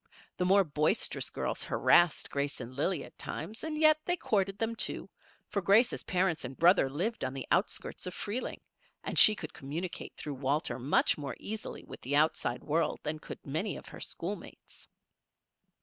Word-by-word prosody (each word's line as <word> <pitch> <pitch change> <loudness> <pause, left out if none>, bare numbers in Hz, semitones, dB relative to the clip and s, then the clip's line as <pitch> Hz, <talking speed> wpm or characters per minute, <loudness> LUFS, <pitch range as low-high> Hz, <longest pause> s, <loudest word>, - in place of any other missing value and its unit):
The 180 - +1
more 195 +2 +6
boisterous 150 -2 0
girls - - -3
harassed 175 -3 +3
Grace 140 0 -2
and 125 0 -7
Lillie 150 +2 0
at - - -14
times, 220 +2 -5
and 315 -1 -3
yet 310 0 +6
they 355 +2 0
courted 195 - 0
them, 225 +1 -1
too, - - 0 0.4
for 200 - -1
Grace's 210 +7 +4
parents 180 -3 0
and 130 +1 -7
brother 170 -5 +5
lived 180 - -2
on 130 +1 -2
the 135 - -4
outskirts - - 0
of 180 - -5
Freeling 225 +5 -4 0.4
and - - 0
she 215 - +9
could 160 -6 -7
communicate 160 +6 -5
through 150 - -5
Walter 135 -1 -1
much 135 +4 +2
more 140 -4 -4
easily 220 +1 -5
with - - -10
the 140 +3 -1
outside 145 -5 +1
world 160 +2 0
than 155 +1 -3
could - - -9
many 160 +9 -2
of - - -11
her - - -10
schoolmates. 200 +5 -6
170 Hz, 175 wpm, -31 LUFS, 145-205 Hz, 0.4 s, she